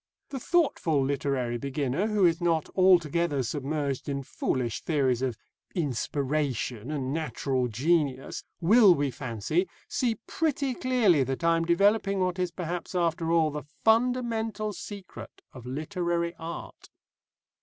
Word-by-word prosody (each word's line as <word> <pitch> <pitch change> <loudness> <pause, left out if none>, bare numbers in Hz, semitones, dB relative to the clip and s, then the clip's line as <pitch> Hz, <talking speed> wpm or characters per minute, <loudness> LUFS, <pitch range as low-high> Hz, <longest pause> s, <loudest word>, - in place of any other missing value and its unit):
The 270 - -4
thoughtful 210 - +1
literary 135 -3 -1
beginner 140 - -1
who 210 -3 +3
is 170 0 +2
not 165 -3 +1
altogether 170 -5 +3
submerged 140 +1 -2
in 140 -1 -2
foolish 125 -3 -2
theories 135 -6 +1
of 125 -4 -1 0.4
inspiration 135 - -1
and 140 -3 -2
natural 135 -5 -1
genius 135 +2 0 0.2
will, 200 +1 +6
we 140 -2 0
fancy, 130 - -2 0.2
see 240 -3 0
pretty 285 -4 -1
clearly 235 - +3
that 135 +5 -4
I 165 0 +4
am 165 0 0
developing 200 +3 +3
what 185 0 0
is 180 -1 +1
perhaps 175 +1 -5
after 165 -1 0
all 160 -2 +3
the 150 0 -4
fundamental 225 - 0
secret 200 -2 -9
of 125 -4 -10
literary 170 +4 -2
art. 165 +1 -8
165 Hz, 130 wpm, -28 LUFS, 135-185 Hz, 0.4 s, will